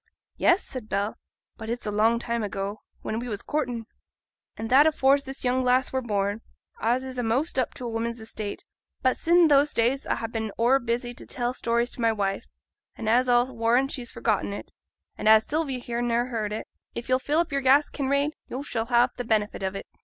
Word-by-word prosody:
'Yes,' 350 +4 +3
said 245 -5 -7
Bell; 205 +2 -1 0.4
'but 220 0 -7
it's 240 +1 -3
a 210 - -1
long 220 +3 +3
time 235 0 -2
ago; 200 0 -4 0.2
when 220 - -2
we 245 - -5
was 205 -2 -4
courting.' 245 -7 -2 0.7
'An' 225 - -4
that's 275 +6 +6
afore 270 +1 +5
this 270 -1 -7
young 255 +1 +1
lass 250 +1 +2
were 260 - +1
born, 205 -2 -1 0.4
as 245 +3 +1
is 260 -1 -5
a'most 250 +6 0
up 255 - -1
to 250 - -5
woman's 230 +1 -3
estate. 215 -2 -6 0.4
But 260 -1 +3
sin' 340 0 +4
those 290 0 +4
days 245 +4 +1
a - - +1
ha' 230 - -4
been 220 -2 -3
o'er 245 +4 +4
busy 240 0 -2
to - - -10
tell 245 0 -1
stories 235 0 0
to - - -7
my 230 -1 +4
wife, 195 -2 -2 0.5
an' 225 - -6
as 245 +3 +4
a'll 245 +1 +3
warrant 235 +4 +2
she's 245 -3 -4
forgotten 210 -2 -1
it; - - -8 0.5
an' - - -1
as 220 0 +7
Sylvia 295 -3 -1
here 240 -1 -3
niver 240 +1 0
heerd 220 -4 -2
it, 215 - -4 0.3
if 235 - -5
yo'll 255 0 +3
fill 300 +6 +1
your 275 0 0
glass, 275 +3 +4
Kinraid, 280 +1 0 0.2
yo' 265 +3 -5
shall 225 -6 -2
ha' 240 0 +4
t' 245 - -4
benefit 215 -4 0
o't. 195 +1 -3
240 Hz, 205 wpm, -26 LUFS, 225-260 Hz, 0.7 s, as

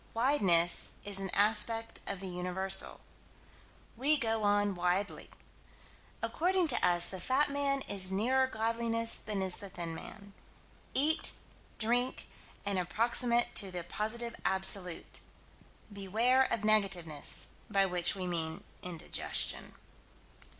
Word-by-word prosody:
Wideness 195 -10 +2
is 200 -1 -2
an 195 -1 -5
aspect 220 +3 +1
of 195 -1 -4
the 195 - -6
Universal. 180 +2 +3 0.9
We 285 +6 +3
go 225 -4 -1
on 205 -1 +1
widely. 180 +3 -2 0.9
According 360 0 0
to 250 - +1
us 175 -1 +3
the 190 - -5
fat 270 +9 +1
man 280 -1 -1
is 190 -6 +5
nearer 255 +7 +1
godliness 230 0 +1
than 205 -3 -4
is 185 -1 +2
the 200 - -9
thin 170 -2 -6
man. 200 +4 -11 0.6
Eat, 310 +4 +3 0.4
drink, 245 +3 0 0.4
and 200 -2 0
approximate 235 +5 0
to 195 - 0
the 180 -1 -5
Positive 225 +6 -3
Absolute. 190 -2 -1 0.7
Beware 225 +7 +1
of 225 - -1
negativeness, 190 -8 0 0.2
by 195 -2 +2
which 180 -1 0
we 185 -2 -5
mean 165 -2 -4 0.2
indigestion. 175 -3 -1
205 Hz, 120 wpm, -31 LUFS, 185-235 Hz, 0.9 s, is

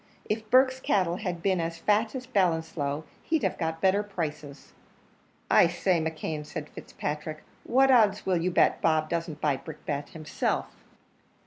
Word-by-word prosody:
If 215 0 -3
Burke's 260 +1 +4
cattle 180 -8 +1
had 180 -5 -4
been 190 -3 +2
as 165 0 -3
fat 215 +5 +1
at 255 0 -7
Ballinasloe, 160 -6 0 0.2
he'd 320 -2 -1
have - - -1
got 160 -1 -2
better 195 +1 +3
prices." 155 -8 -6 0.7
"I - - +6
say, 175 0 +1
McKeon," 155 -1 -3
said 150 0 -7
Fitzpatrick, 155 +1 -6 0.2
"what 270 +2 +4
odds 210 -5 +4
will 185 -2 +2
you 180 - +1
bet 180 - +3
Bob 155 -1 +2
doesn't 165 -3 -3
buy 145 -3 +1
Brickbat 145 -2 -6
himself?" 155 -2 -2
170 Hz, 150 wpm, -27 LUFS, 155-205 Hz, 0.7 s, I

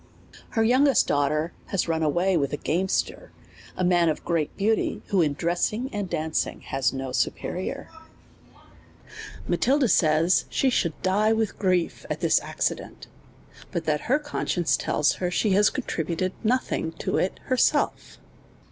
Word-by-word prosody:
Her 225 - +4
youngest 260 +2 +4
daughter 150 +3 0 0.2
is 195 - 0
run 165 -1 0
away 175 +5 +1
with 140 -4 0
a - - -1
game 180 +6 -1
ster, - - -2 0.5
a 185 - 0
man 175 -2 +3
of 155 - -3
great 165 -4 -1
beauty, 215 +2 0
who 195 -4 +3
in 150 -3 +1
dressing 195 - -1
and 205 -3 -3
danc 155 0 -1
ing - - -10
has 135 -1 -1
no 135 -1 -5
superior, - - -3 1.6
Matilda 260 +10 +2
says, 160 -2 +3
she 265 - +1
should 170 -9 0
die 210 +4 +3
with 220 -2 -2
grief 185 -3 0
at - - -3
this - - +3
acci - - -2
dent, - - -11 0.7
but 170 -4 -3
that 150 -1 0
her 265 - +5
conscience 240 - -1
tells 150 - +1
her 180 - 0
she 200 +4 0
has 205 +2 +5
contri 235 -10 -3
buted 175 +3 -2
nothing 225 -8 0
to - - -2
it 185 - -1
herself. 255 -1 0
180 Hz, 155 wpm, -25 LUFS, 160-215 Hz, 1.6 s, her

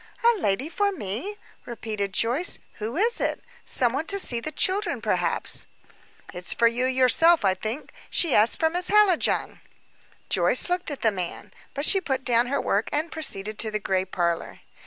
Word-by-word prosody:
"A 470 -2 +3
lady 205 - -1
for 400 +5 -1
me?" 330 - -6 0.3
repeated 215 -4 -5
Joyce. 245 - 0 0.2
"Who 225 +7 -5
is 460 +5 +3
it? - - -1 0.3
Some 245 -2 +3
one 305 +5 -3
to 400 - 0
see 245 -11 +3
the 310 +6 -5
children, 390 +6 -1
perhaps." - - -1 0.7
"It's 180 0 0
for 235 - +2
yourself, 255 +5 +3
I 190 - +3
think. 220 +9 -6 0.2
She 335 -5 0
asked 215 +3 +4
for 320 -1 +2
Miss 355 +1 +1
Hallijohn." 415 -5 +2 0.7
Joyce - - +2
looked 360 -1 -1
at 285 - -6
the 225 - +2
man; 180 -3 -7 0.2
but 280 +2 +1
she 390 - +3
put 265 -6 -3
down 240 -1 +2
her 280 +2 -1
work 205 +3 -1
and 310 +3 -2
proceeded 215 -9 +1
to 220 - -1
the 215 - -2
gray 190 -2 -1
parlor. 175 -2 -3
255 Hz, 175 wpm, -24 LUFS, 215-340 Hz, 0.7 s, asked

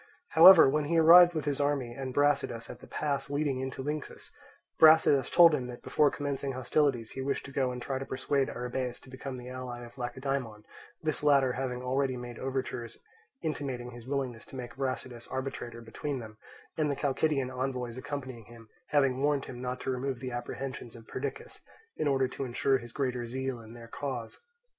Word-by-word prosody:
However, 165 0 +9
when 150 +2 +1
he 165 +3 +1
arrived 175 +2 +8
with 155 -3 -2
his 145 -1 -1
army 140 -4 0
and 130 +1 -5
Brasidas 140 -4 +1
at 120 - -11
the - - -14
pass 140 -2 -2
leading 145 -2 0
into 130 0 -4
Lyncus, 150 +1 -5 0.5
Brasidas 155 -4 +6
told 170 -2 +7
him 130 -4 -1
that 120 -1 -9
before 150 -1 +3
commencing 140 -1 -3
hostilities 130 -2 0
he 135 - -5
wished 140 +1 -2
to 140 - -9
go 130 -2 0
and 125 - -5
try 130 +2 -3
to 135 - -5
persuade 135 +1 0
Arrhabaeus 125 0 -3
to 130 - -16
become 130 0 -6
the 125 0 -8
ally 125 -1 -6
of 120 +3 -14
Lacedaemon, 125 -3 -3 0.4
this 155 -1 -1
latter 140 -3 +4
having 125 -1 -3
already 130 0 0
made 120 -1 -8
overtures 130 -2 -4 0.5
intimating 135 -6 -3
his 120 0 -11
willingness 130 -4 -3
to - - -11
make 125 -2 -7
Brasidas 130 -3 -4
arbitrator 130 -3 -5
between 135 +5 -4
them, 110 -3 -9 0.4
and 150 -1 +2
the 140 - 0
Chalcidian 140 -1 0
envoys 125 -2 -3
accompanying 130 -3 -6
him 115 0 -15 0.2
having 135 -3 +2
warned 145 -1 +1
him 125 -1 -8
not 125 0 -3
to - - -2
remove 130 0 -2
the 130 +1 -5
apprehensions 120 0 -6
of 115 -1 -13
Perdiccas, 135 0 -6 0.3
in 155 - -1
order 135 -2 +2
to 130 - -5
ensure 130 +1 +1
his 120 -1 -10
greater 125 -3 -2
zeal 130 0 -3
in 110 0 -12
their 115 -1 -11
cause. 120 -3 -5
130 Hz, 190 wpm, -30 LUFS, 125-140 Hz, 0.5 s, However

